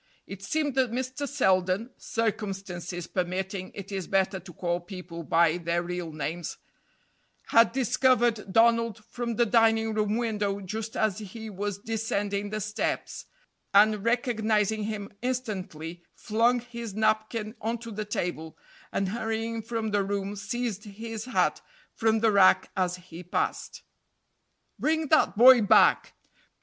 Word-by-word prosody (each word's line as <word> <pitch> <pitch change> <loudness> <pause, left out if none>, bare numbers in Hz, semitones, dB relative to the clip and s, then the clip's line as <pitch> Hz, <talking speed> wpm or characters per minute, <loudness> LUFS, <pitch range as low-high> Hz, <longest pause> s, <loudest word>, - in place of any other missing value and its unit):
It 195 0 -9
seemed 290 +8 -1
that 260 -1 +2
Mr. 260 +3 -3
Selden 190 -3 +1
(circumstances 195 -5 -3
permitting, 185 +1 -3
it 200 0 -8
is 190 -2 -3
better 190 0 +1
to 180 0 -12
call 175 +1 -2
people 175 -2 -8
by 165 +1 +3
their 170 0 -1
real 175 -1 -4
names) 155 +3 -4 0.9
had 230 -1 +6
discovered 240 -4 +2
Donald 230 0 +3
from 240 -1 -4
the 240 - +3
dining 225 -1 +3
room 215 0 0
window 210 -4 -1
just 215 +3 -5
as 215 -2 +1
he 220 +2 -8
was 205 0 -3
descending 205 -2 -2
the 215 +1 -3
steps, 210 +1 -3 0.5
and 210 0 +5
recognizing 220 -3 +1
him 210 -1 -5
instantly 190 -10 -4
flung 235 +3 +2
his 235 -3 -7
napkin 215 0 0
onto 230 +1 -3
the 215 0 -3
table, 175 -6 -4 0.3
and 195 -1 -1
hurrying 225 +1 -2
from 225 -1 -3
the 205 -1 +2
room 200 0 -3
seized 215 +1 -3
his 220 +2 -7
hat 255 - +1 0.3
from 220 -1 +1
the 225 -1 +4
rack 195 -2 +5
as 180 -1 0
he 180 -1 -11
passed. 180 - -3 1.0
"Bring 315 -1 0
that 310 - +3
boy 250 +1 +9
back!" 205 - +4
215 Hz, 135 wpm, -27 LUFS, 190-230 Hz, 1.0 s, boy